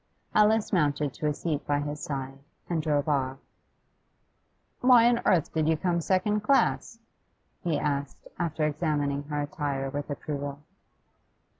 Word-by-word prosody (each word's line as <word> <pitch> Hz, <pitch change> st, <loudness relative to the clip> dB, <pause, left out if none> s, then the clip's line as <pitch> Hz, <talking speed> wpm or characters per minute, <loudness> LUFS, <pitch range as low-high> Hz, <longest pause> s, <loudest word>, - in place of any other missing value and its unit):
Alice 215 Hz, 0 st, +3 dB
mounted 145 Hz, -5 st, +1 dB
to 150 Hz, -, -3 dB
a 150 Hz, -, +1 dB
seat 150 Hz, -3 st, -2 dB
by 145 Hz, 0 st, +2 dB
his 145 Hz, +1 st, -4 dB
side, 135 Hz, -2 st, -5 dB, 0.3 s
and 170 Hz, -2 st, -1 dB
he -, -, -3 dB
drove 145 Hz, 0 st, +1 dB
off. 135 Hz, -3 st, 0 dB, 1.4 s
'Why 245 Hz, -2 st, +6 dB
on 240 Hz, -1 st, +3 dB
earth 170 Hz, -4 st, +2 dB
did 155 Hz, -1 st, +1 dB
you 160 Hz, -, +2 dB
come 170 Hz, 0 st, 0 dB
second 195 Hz, +4 st, +1 dB
class?' 235 Hz, -1 st, +2 dB, 0.7 s
he 170 Hz, -4 st, +1 dB
asked, 140 Hz, -1 st, -3 dB
after 160 Hz, -3 st, 0 dB
examining 145 Hz, -2 st, 0 dB
her 145 Hz, 0 st, -2 dB
attire 140 Hz, -2 st, -3 dB
with 145 Hz, +1 st, -4 dB
approval. 145 Hz, -1 st, -4 dB
150 Hz, 145 wpm, -28 LUFS, 145-175 Hz, 1.4 s, Why